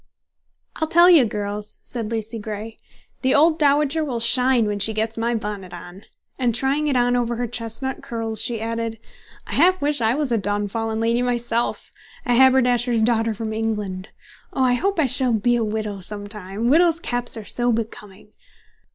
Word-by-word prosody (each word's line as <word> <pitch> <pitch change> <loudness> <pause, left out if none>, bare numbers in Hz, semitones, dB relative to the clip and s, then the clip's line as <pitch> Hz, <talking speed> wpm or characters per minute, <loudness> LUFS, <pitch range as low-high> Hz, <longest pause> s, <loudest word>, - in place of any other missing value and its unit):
"I'll 315 - -1
tell 345 +3 +6
you, 310 -8 +7
girls," 210 -1 -5
said 230 -3 -5
Lucy 225 0 -4
Grey, 215 +1 -6 0.5
"the 260 0 +2
old 315 +2 +4
dowager 295 +1 +3
will 255 -6 -3
shine 250 0 +3
when 205 -1 -2
she 220 +2 +1
gets 220 +1 -1
my 235 +1 -1
bonnet 205 -4 -5
on!" 175 +4 -11 0.3
and 240 -3 +1
trying 275 +4 0
it 280 - +1
on 245 0 +2
over 240 -1 0
her 245 +1 -2
chestnut 240 +4 -5
curls, 225 -5 -1
she 235 -2 -1
added, 230 0 -3 0.5
"I - - -10
half 370 +1 +4
wish 290 -2 0
I 225 +2 +2
was 290 -3 -1
a 230 - +2
downfallen 205 +3 -2
lady 230 +2 +1
myself, 240 -1 -2 0.3
a 245 - +2
haberdasher's 245 -2 +4
daughter 225 -1 +1
from 220 +1 -4
England! 210 -4 -3 0.4
Oh, 265 - +1
I 250 -1 +3
hope 390 +10 0
I 310 - +4
shall 255 -1 +1
be 240 +3 +2
a 235 - 0
widow 215 -2 -3
some 205 +2 -2
time! 205 +1 -5
Widows' 335 +1 +4
caps 245 -6 -3
are 220 - -7
so 240 +2 -1
becoming!" 210 -2 -6
230 Hz, 180 wpm, -22 LUFS, 215-255 Hz, 0.5 s, you